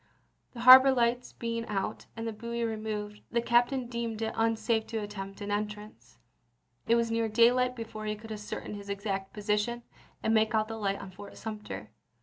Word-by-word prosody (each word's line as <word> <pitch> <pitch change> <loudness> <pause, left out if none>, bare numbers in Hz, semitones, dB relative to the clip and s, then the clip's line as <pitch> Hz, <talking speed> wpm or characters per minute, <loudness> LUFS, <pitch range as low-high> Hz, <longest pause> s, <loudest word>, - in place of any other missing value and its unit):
The 235 - -7
harbor 260 +2 +10
lights 245 -1 +1
being 230 0 -3
out, 200 +1 -3
and 225 0 -3
the 225 - -3
buoy 235 +2 -4
removed, 215 -2 -4
the 235 - +1
captain 240 +2 +2
deemed 235 -2 -3
it 220 - -2
un 225 0 +2
safe 220 0 0
to 225 - -3
attempt 205 -2 -6
an 205 0 -4
entrance. 210 +1 -5 0.7
It 230 - +5
was 230 -1 +1
near 230 -1 +1
daylight 250 +3 +4
before 220 -2 -6
he 210 - -1
could 220 +1 -11
ascertain 210 0 -6
his 200 -1 -8
exact 195 -1 -3
position, 210 +3 -1 0.4
and 220 - +2
make 220 0 +3
out 215 0 +1
the 225 - -4
light 200 -2 -1
on 190 - -8
Fort 200 +2 -11
Sumter. 110 - -7
220 Hz, 185 wpm, -30 LUFS, 210-235 Hz, 0.7 s, harbor